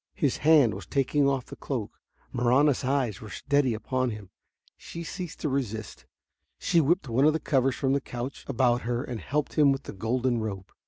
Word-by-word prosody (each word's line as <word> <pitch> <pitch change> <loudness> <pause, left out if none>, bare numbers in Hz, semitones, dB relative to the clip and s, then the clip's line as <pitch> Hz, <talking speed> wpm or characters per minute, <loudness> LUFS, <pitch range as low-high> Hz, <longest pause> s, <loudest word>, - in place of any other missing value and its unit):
His 140 -4 +1
hand 150 -7 +5
was - - -8
taking 140 +1 +2
off 135 -2 -1
the - - -10
cloak. - - -5 0.3
Marahna's 130 +4 +3
eyes 130 -4 0
were 110 - -9
steady 140 -3 +1
upon 130 +3 -1
him. 105 -4 -8 0.4
She 170 - -8
ceased 175 0 -7
to - - 0
resist. 110 -6 -4 0.5
She 170 - +2
whipped 160 +1 +1
one 125 +4 +2
of 155 - +5
the 160 - 0
covers 135 -4 +1
from 135 -1 0
the 140 - +1
couch 125 +2 -6
about 125 -2 +2
her 120 +2 -2
and 120 -5 -5
helped 150 +2 -2
him 145 -2 +6
with 135 - -2
the - - -8
golden 120 +4 0
robe. 100 -4 -5
130 Hz, 195 wpm, -27 LUFS, 120-145 Hz, 0.5 s, him